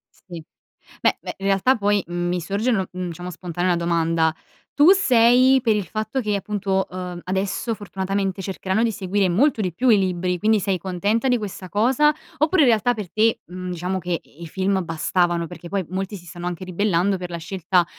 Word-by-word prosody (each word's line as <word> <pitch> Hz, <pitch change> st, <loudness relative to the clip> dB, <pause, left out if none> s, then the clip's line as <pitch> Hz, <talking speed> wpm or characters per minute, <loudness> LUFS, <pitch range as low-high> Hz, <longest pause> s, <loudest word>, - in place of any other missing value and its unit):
Sì. 170 Hz, -4 st, -10 dB, 0.6 s
Beh, -, -, +2 dB
beh, -, -, -6 dB
in 195 Hz, -, -7 dB
realtà 200 Hz, +7 st, +3 dB
poi, 205 Hz, -2 st, +1 dB
mhmm, 175 Hz, 0 st, -2 dB
mi 180 Hz, 0 st, -1 dB
sorge 200 Hz, +8 st, -1 dB
nor 190 Hz, -5 st, 0 dB
mhmm, 180 Hz, 0 st, -4 dB
diciamo 175 Hz, +2 st, -7 dB
spontanea 175 Hz, +1 st, -1 dB
una -, -, 0 dB
domanda. 165 Hz, -1 st, +1 dB, 0.4 s
Tu 295 Hz, +4 st, +6 dB
sei 255 Hz, -6 st, +5 dB
per 225 Hz, -3 st, +2 dB
il 205 Hz, -3 st, -1 dB
fatto 220 Hz, +7 st, -3 dB
che 210 Hz, -4 st, -1 dB
appunto, 195 Hz, -1 st, -1 dB
uhm, 180 Hz, -1 st, -6 dB
adesso 195 Hz, +5 st, -2 dB
fortunatamente 195 Hz, -1 st, -3 dB
cercheranno 190 Hz, +2 st, -1 dB
di 230 Hz, -, +2 dB
seguire 195 Hz, -2 st, 0 dB
molto 225 Hz, +6 st, +2 dB
di 185 Hz, -, -1 dB
più 255 Hz, +9 st, -1 dB
i 220 Hz, -, +7 dB
libri, 180 Hz, -1 st, 0 dB
quindi 215 Hz, +3 st, +2 dB
sei 195 Hz, -1 st, 0 dB
contenta 200 Hz, +7 st, -1 dB
di 245 Hz, -, +3 dB
questa 195 Hz, -3 st, -7 dB
cosa? 255 Hz, -, +3 dB, 0.3 s
Oppure 310 Hz, +2 st, +4 dB
in -, -, +5 dB
realtà 235 Hz, +1 st, +3 dB
per 210 Hz, -6 st, -6 dB
te, 225 Hz, +1 st, +2 dB
mhmm, 185 Hz, 0 st, -7 dB
diciamo 180 Hz, +2 st, -2 dB
che 175 Hz, -1 st, -2 dB
i -, -, -26 dB
i -, -, -6 dB
film 190 Hz, +3 st, 0 dB
bastavano? 170 Hz, +1 st, 0 dB
Perché 175 Hz, 0 st, -10 dB
poi 195 Hz, -1 st, -2 dB
molti 195 Hz, +2 st, -4 dB
si 175 Hz, -, -15 dB
stanno 175 Hz, +1 st, -7 dB
anche 180 Hz, +1 st, -5 dB
ribellando 190 Hz, +1 st, +1 dB
per 180 Hz, -1 st, -6 dB
la 170 Hz, -, -4 dB
scelta, 180 Hz, +1 st, 0 dB
190 Hz, 205 wpm, -22 LUFS, 180-215 Hz, 0.6 s, i